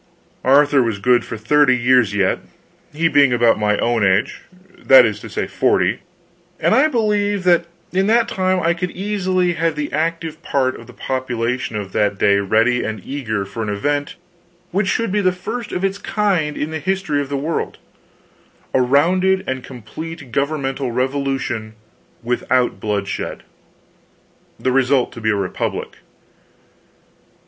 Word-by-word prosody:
Arthur 140 +1 +4
was 115 -4 -1
good 125 +4 +3
for 115 - -6
thirty 130 +3 +3
years 120 -4 +3
yet, 100 -2 +1 0.5
he 165 +3 +1
being 145 -3 +4
about 120 -2 +3
my 105 -1 +1
own 120 -2 +1
age 100 +7 +1 0.4
that - - +7
is - - -2
to - - -10
say, - - -2
forty - - +1 0.6
and - - +2
I 310 - +5
believed 210 -6 0
that 175 -1 +3 0.3
in 190 +2 +1
that 230 +1 +3
time 185 -4 0
I 170 -1 +2
could 180 +2 -3
easily 185 -2 -1
have 165 -1 -1
the 150 -1 -4
active 165 +1 -2
part 130 -5 0
of - - -13
the - - -13
population 125 -2 -3
of 100 -2 -5
that 105 0 0
day 100 +1 +3
ready 115 +5 +2
and 110 -1 -4
eager 110 -8 -3
for 100 +4 -7
an 110 - -3
event 145 +8 -2 0.6
which 195 +1 0
should 230 0 0
be 205 +1 +1
the 185 -2 +3
first 205 +5 -6
of 180 - -1
its 195 +1 -2
kind 185 -8 0
in 155 - -3
the 160 - -3
history 180 -3 -1
of 140 - -6
the 140 - -2
world 155 +4 -3 1.0
a 130 - +3
rounded 180 +9 +2
and 130 -1 -3
complete 135 +4 -9
governmental 140 -1 -1
revolution 130 -4 -2 0.5
without 125 +1 0
bloodshed. 100 -2 -3 1.2
The 130 - 0
result 130 0 +2
to 115 - -10
be 110 - 0
a 105 - +2
republic. 100 -2 -3
140 Hz, 155 wpm, -19 LUFS, 120-175 Hz, 1.2 s, that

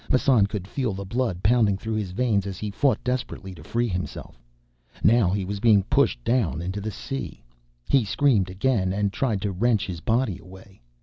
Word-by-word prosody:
Massan 125 -5 +4
could 100 -2 -5
feel 125 -2 -2
the 100 +1 -6
blood 115 -4 -2
pounding 110 -2 +3
through 110 +2 -4
his 105 -3 -2
veins 100 0 0
as 95 -2 -5
he 105 -1 -4
fought 135 +6 +1
desperately 125 -6 -3
to 80 -4 -13
free 120 +7 -1
himself. 90 - -6 0.6
Now 110 -3 +5
he 95 0 -1
was 100 +1 -4
being 105 -3 +5
pushed 135 +7 +1
down 115 -9 +1
into 95 +4 -4
the 110 - -3
sea. 135 +5 -6 0.4
He 135 -3 +4
screamed 110 -4 +2
again 95 -1 0
and 100 0 0
tried 110 -7 -1
to 100 - -1
wrench 110 +3 +1
his 90 -3 -5
body 115 -4 0
away. 95 -1 -15
105 Hz, 190 wpm, -25 LUFS, 95-120 Hz, 0.6 s, Now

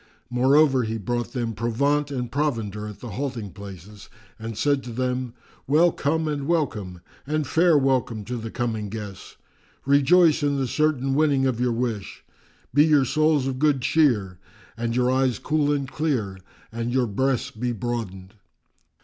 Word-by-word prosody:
Moreover, 135 +2 +4
he 110 -1 -2
brought 120 +3 -3
them 120 -3 -2
provaunt 140 +7 0
and 125 -4 -4
provender 115 -8 -2
at 105 - -10
the 120 - -7
halting 120 -3 -4
places 100 +1 -11 0.3
and 110 -1 -6
said 140 -2 +1
to 125 - -7
them, 125 0 -2 0.3
"Well 160 +5 +4
come 160 +2 -1
and 145 -2 -3
welcome 105 - -1 0.3
and 155 0 0
fair 165 +3 +4
welcome 130 -6 0
to 125 +2 -4
the 115 0 -6
coming 110 -3 -3
guests! 105 -3 -8 0.5
Rejoice 155 +4 +4
in 145 -1 +1
the 135 - 0
certain 135 0 0
winning 140 -2 +2
of 130 -3 0
your 125 0 +1
wish! 115 -4 -3 0.5
Be 145 +3 +6
your 150 -3 +4
souls 155 0 +2
of 130 -1 -3
good 145 -3 +2
cheer 110 - +2 0.4
and 115 0 -2
your 125 0 +2
eyes 130 -3 +1
cool 150 -1 0
and 140 -2 -1
clear 130 -11 -2 0.3
and 115 +1 -3
your 130 0 +2
breasts 130 +4 -1
be 120 +3 -3
broadened!" 105 -5 -5
125 Hz, 160 wpm, -24 LUFS, 115-145 Hz, 0.5 s, Be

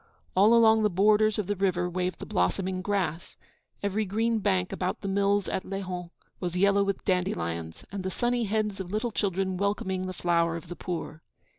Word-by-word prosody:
All 210 +5 +6
along 220 -1 +6
the 210 - +3
borders 210 +3 +3
of 210 - -1
the 205 +2 -1
river 185 -2 +1
waved 180 0 -2
the - - -7
blossoming 185 - 0
grass; 185 -5 -2 0.5
every 200 +2 0
green 220 +3 0
bank 190 -3 +1
about 180 0 -2
the 200 - -4
mills 200 +1 +2
at - - -2
Lehon 185 -3 -5 0.3
was 180 -1 -3
yellow 200 +1 +4
with 200 -1 -2
dandelions, 85 - -2
and 200 0 -4
the 190 - -1
sunny 240 +4 0
heads 210 -1 -1
of 185 -1 -5
little 215 +3 -1
children 190 -2 -1
welcoming 190 -1 -1
the 185 - -4
flower 170 -2 +1
of 170 0 -8
the 175 - -5
poor. 165 -3 -5
190 Hz, 185 wpm, -28 LUFS, 180-205 Hz, 0.5 s, All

